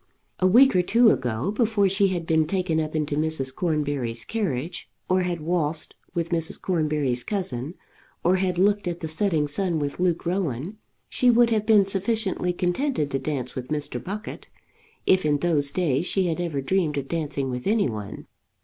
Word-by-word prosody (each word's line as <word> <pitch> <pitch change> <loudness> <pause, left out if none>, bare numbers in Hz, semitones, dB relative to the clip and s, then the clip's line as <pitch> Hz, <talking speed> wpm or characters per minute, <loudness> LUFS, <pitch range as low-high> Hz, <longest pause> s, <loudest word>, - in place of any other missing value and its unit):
A 185 - +4
week 245 +5 +6
or 180 - +5
two 230 +5 +5
ago, 125 - -1
before 215 -2 +2
she 195 +1 +2
had 175 -3 -2
been 160 -1 +2
taken 180 -3 0
up 155 0 -3
into 150 -2 -1
Mrs. 150 -4 0
Cornbury's 145 -8 -2
carriage, 175 - -3 0.2
or 185 0 +2
had 175 -2 -2
waltzed 160 -1 -1 0.2
with 170 0 -2
Mrs. 165 -1 0
Cornbury's 150 -8 0
cousin, 165 - -3 0.5
or 180 +2 +3
had 185 -1 -1
looked 200 +1 +2
at 175 0 -4
the 160 - -3
setting 160 -2 +1
sun 175 +3 -1
with 145 0 -3
Luke 175 -2 0
Rowan, 175 - -2 0.3
she 250 - +2
would 240 0 +5
have 215 -1 0
been 210 -3 +6
sufficiently 195 -1 0
contented 180 - -1
to 135 - 0
dance 135 -3 -3
with 125 -1 -6
Mr. 150 0 -4
Buckett, 205 +3 -6 0.6
if 185 0 +4
in 150 -1 +2
those 145 -3 +1
days 165 -1 0
she 190 -2 +1
had 170 0 -1
ever 160 -6 -2
dreamed 155 0 0
of 135 -1 -3
dancing 145 -5 -2
with 125 +4 -4
any 210 -3 +2
one. 105 -4 -6
170 Hz, 180 wpm, -24 LUFS, 145-190 Hz, 0.6 s, week